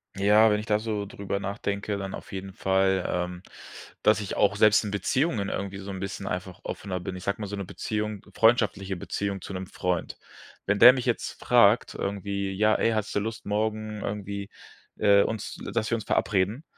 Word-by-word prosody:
Ja, 105 Hz, +3 st, +5 dB
wenn 105 Hz, 0 st, +2 dB
ich 105 Hz, -, -6 dB
da 105 Hz, -1 st, +2 dB
so 105 Hz, -2 st, -3 dB
drüber 100 Hz, 0 st, -4 dB
nachdenke, 100 Hz, +1 st, -3 dB
dann 95 Hz, -1 st, -5 dB
auf -, -, -11 dB
jeden 95 Hz, 0 st, -6 dB
Fall, 95 Hz, -1 st, +1 dB
ähm, 90 Hz, 0 st, -3 dB, 0.6 s
dass 105 Hz, 0 st, +4 dB
ich 100 Hz, -3 st, -4 dB
auch 100 Hz, 0 st, +3 dB
selbst 105 Hz, 0 st, +5 dB
in 105 Hz, -, -3 dB
Beziehungen 110 Hz, +1 st, 0 dB
irgendwie 100 Hz, 0 st, -4 dB
so 100 Hz, 0 st, -7 dB
'n 95 Hz, -, -6 dB
bisschen 95 Hz, +1 st, -5 dB
einfach -, -, -4 dB
offener 95 Hz, -2 st, -4 dB
bin. 90 Hz, +1 st, -5 dB
Ich 90 Hz, -, -8 dB
sage 100 Hz, +2 st, -2 dB
mal, 105 Hz, -, -3 dB
so 100 Hz, -, -5 dB
'ne 100 Hz, -1 st, -4 dB
Beziehung 105 Hz, +2 st, -4 dB
freundschaftliche 105 Hz, -4 st, +2 dB
Beziehung 100 Hz, +2 st, -3 dB
zu 95 Hz, -, -7 dB
'nem 95 Hz, 0 st, -5 dB
Freund. 90 Hz, -2 st, -2 dB, 0.5 s
Wenn 100 Hz, +1 st, +1 dB
der 125 Hz, +2 st, +10 dB
mich 130 Hz, -2 st, -3 dB
jetzt 120 Hz, -2 st, -2 dB
fragt, -, -, +4 dB
irgendwie: 100 Hz, 0 st, -3 dB
„Ja, 110 Hz, +3 st, +3 dB
ey, 115 Hz, -, +2 dB
hast 110 Hz, -2 st, -2 dB
du -, -, +3 dB
Lust 110 Hz, +2 st, -5 dB
morgen 110 Hz, 0 st, -2 dB
irgendwie, 100 Hz, 0 st, -4 dB, 0.5 s
äh, 100 Hz, -1 st, +5 dB
uns, 110 Hz, 0 st, -3 dB
l -, -, -5 dB
dass 115 Hz, 0 st, -1 dB
wir -, -, +3 dB
uns 110 Hz, -, -5 dB
verabreden 105 Hz, -, +1 dB
100 Hz, 200 wpm, -27 LUFS, 95-110 Hz, 0.6 s, der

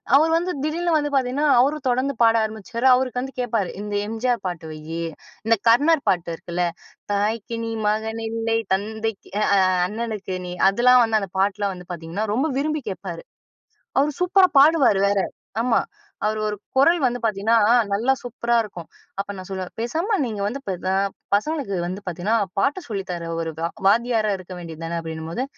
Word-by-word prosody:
அவரு 315 Hz, +3 st, +5 dB
வந்து 360 Hz, +2 st, -1 dB
திடீர்னு 335 Hz, +3 st, 0 dB
வந்து 295 Hz, -1 st, -1 dB
பார்த்தீங்கன்னா, 270 Hz, +3 st, +1 dB
அவரும் 285 Hz, +2 st, +1 dB
தொடர்ந்து 260 Hz, +3 st, +1 dB
பாட 225 Hz, 0 st, +5 dB
ஆரம்பிச்சிருவாரு. 220 Hz, +4 st, -2 dB
அவருக்கு 250 Hz, -1 st, -1 dB
வந்து 265 Hz, +1 st, -6 dB
கேட்பாரு. 225 Hz, -6 st, -1 dB
இந்த 210 Hz, 0 st, -5 dB
எம்ஜிஆர் 230 Hz, 0 st, -1 dB
பாட்டு 175 Hz, -2 st, -5 dB
வைய்யி, 160 Hz, +2 st, -5 dB, 0.4 s
இந்த 230 Hz, 0 st, +4 dB
கர்ணர் 290 Hz, +5 st, +4 dB
பாட்டு 175 Hz, -2 st, 0 dB
இருக்குல்ல, 175 Hz, +1 st, -2 dB, 0.5 s
"தாய்க்கு 215 Hz, +3 st, -1 dB
நீ 225 Hz, -, -3 dB, 0.2 s
மகன் 220 Hz, +1 st, -2 dB
இல்லை, 225 Hz, 0 st, 0 dB, 0.2 s
தந்தைக்கு 220 Hz, +1 st, -3 dB
அ -, -, +3 dB
அ -, -, +5 dB, 0.3 s
அண்ணனுக்கு 215 Hz, -3 st, -4 dB
நீ," -, -, -5 dB, 0.2 s
அதுல்லாம் 245 Hz, +4 st, +5 dB
வந்து 220 Hz, -1 st, +2 dB
அந்த 195 Hz, -, -5 dB
பாட்லாம் 200 Hz, 0 st, +1 dB
வந்து 180 Hz, 0 st, -12 dB
பார்த்தீங்கன்னா, 170 Hz, +6 st, -4 dB
ரொம்ப 280 Hz, +7 st, +1 dB
விரும்பி 305 Hz, 0 st, -1 dB
கேட்பாரு. 185 Hz, -3 st, -6 dB, 0.8 s
அவரு 295 Hz, +2 st, +2 dB
சூப்பரா 370 Hz, +1 st, +5 dB
பாடுவாரு 280 Hz, -9 st, +5 dB
வேற! 200 Hz, -, +2 dB, 0.4 s
ஆமா 240 Hz, -1 st, +3 dB, 0.5 s
அவரு 215 Hz, 0 st, 0 dB
ஒரு 210 Hz, -, -2 dB, 0.2 s
குரல் 330 Hz, +6 st, +5 dB
வந்து 245 Hz, 0 st, 0 dB
பார்த்தீங்கன்னா, 220 Hz, +1 st, +2 dB, 0.4 s
நல்லா 240 Hz, +6 st, +2 dB
சூப்பரா 235 Hz, -1 st, -1 dB
இருக்கும். 180 Hz, -5 st, -9 dB, 0.3 s
அப்ப 200 Hz, +1 st, -3 dB
நான் 185 Hz, -, -8 dB
சொல்லுவேன், 190 Hz, -1 st, -5 dB
பேசாம 335 Hz, -, 0 dB
நீங்க 215 Hz, -4 st, -4 dB
வந்து 250 Hz, +7 st, -4 dB
பெ 190 Hz, -, 0 dB
பெ 185 Hz, -, -1 dB
அ -, -, +2 dB, 0.4 s
பசங்களுக்கு 275 Hz, -2 st, -1 dB
வந்து 190 Hz, +3 st, -5 dB
பார்த்தீங்கன்னா, 180 Hz, +6 st, -1 dB, 0.2 s
பாட்ட 290 Hz, -, +1 dB
சொல்லி 195 Hz, -2 st, -2 dB
தர்ற 170 Hz, -1 st, -5 dB
ஒரு 165 Hz, -1 st, -3 dB
வா 165 Hz, -, 0 dB, 0.2 s
வாத்தியாரா 225 Hz, 0 st, +3 dB
இருக்க 185 Hz, 0 st, -10 dB
வேண்டிய 165 Hz, -2 st, -8 dB
தானே? 170 Hz, +1 st, -3 dB
அப்டின்னும்போது, 160 Hz, +8 st, -4 dB
225 Hz, 170 wpm, -23 LUFS, 195-255 Hz, 0.8 s, அவரு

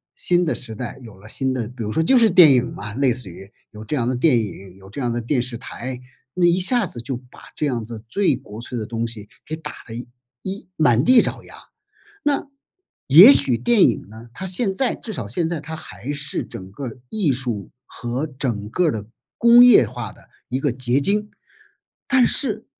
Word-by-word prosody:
新 175 Hz, 0 st, +2 dB
的 160 Hz, -, 0 dB
时 115 Hz, -4 st, -3 dB
代 125 Hz, +4 st, -7 dB
有 110 Hz, -5 st, -13 dB
了 100 Hz, +2 st, -15 dB
新 130 Hz, +2 st, -1 dB
的 120 Hz, -4 st, -3 dB
比 120 Hz, 0 st, -8 dB
如 105 Hz, -, -4 dB
说 160 Hz, -, 0 dB
就 255 Hz, +11 st, +4 dB
是 230 Hz, -2 st, +5 dB
电 175 Hz, -5 st, +8 dB
影 125 Hz, -1 st, 0 dB
嘛 105 Hz, 0 st, -7 dB
类 130 Hz, +1 st, +1 dB
似 120 Hz, -5 st, -3 dB
于， 95 Hz, +3 st, -12 dB, 0.2 s
有 110 Hz, -1 st, -11 dB
这 150 Hz, -, -2 dB
样 125 Hz, -5 st, -1 dB
的 130 Hz, -, -1 dB
电 130 Hz, -1 st, +3 dB
影， 95 Hz, -3 st, -7 dB
有 95 Hz, 0 st, -16 dB
这 105 Hz, -, -8 dB
样 120 Hz, -2 st, -1 dB
的 120 Hz, -, -2 dB
电 125 Hz, +2 st, 0 dB
视 120 Hz, -1 st, -3 dB
台， 125 Hz, +1 st, -7 dB, 0.4 s
那 180 Hz, -1 st, +2 dB
一 175 Hz, +1 st, +3 dB
下 230 Hz, +4 st, +5 dB
子 120 Hz, -9 st, -7 dB
就 125 Hz, +1 st, -4 dB
把 125 Hz, 0 st, -18 dB, 0.2 s
这 -, -, -1 dB
样 125 Hz, -5 st, -2 dB
子 115 Hz, -1 st, -9 dB
最 195 Hz, -, +1 dB
国 105 Hz, +2 st, -10 dB
粹 120 Hz, +1 st, -6 dB
的 110 Hz, -, -4 dB
东 115 Hz, +1 st, -3 dB
西 110 Hz, -3 st, -7 dB, 0.2 s
给 155 Hz, -, -3 dB
打 155 Hz, -2 st, -7 dB, 0.2 s
了 115 Hz, -, -7 dB, 0.5 s
一 190 Hz, 0 st, -7 dB
满 125 Hz, -6 st, +3 dB
地 250 Hz, +6 st, +6 dB
找 -, -, -3 dB
牙。 -, -, -13 dB, 0.7 s
那 290 Hz, -1 st, 0 dB, 0.6 s
也 175 Hz, -, +10 dB
许 130 Hz, -, +3 dB
电 195 Hz, -, +3 dB
影 115 Hz, -, 0 dB
呢， 110 Hz, +2 st, -12 dB
它 190 Hz, -, -7 dB
现 190 Hz, +2 st, 0 dB
在 255 Hz, +6 st, 0 dB
至 220 Hz, -, -6 dB
少 115 Hz, -, -5 dB
现 160 Hz, -, -1 dB
在 165 Hz, -2 st, -3 dB
它 160 Hz, +2 st, -7 dB
还 145 Hz, -3 st, -7 dB
是 145 Hz, -1 st, -1 dB
整 95 Hz, 0 st, -10 dB
个 140 Hz, -, -7 dB
儿 120 Hz, -1 st, -7 dB
艺 190 Hz, -7 st, 0 dB
术 120 Hz, -6 st, -4 dB, 0.2 s
和 125 Hz, +5 st, -4 dB
整 125 Hz, -7 st, -4 dB
个 180 Hz, +10 st, 0 dB
儿 -, -, +2 dB
的 105 Hz, -3 st, -5 dB, 0.3 s
工 235 Hz, +1 st, +7 dB
业 235 Hz, -, +7 dB
化 -, -, -7 dB
的 -, -, -21 dB, 0.2 s
一 130 Hz, +2 st, -2 dB
个 140 Hz, -2 st, 0 dB
结 125 Hz, +1 st, 0 dB
晶。 210 Hz, +6 st, 0 dB, 0.8 s
但 260 Hz, -2 st, +4 dB
是， 220 Hz, -5 st, 0 dB
130 Hz, 240 characters per minute, -21 LUFS, 115-175 Hz, 0.8 s, 也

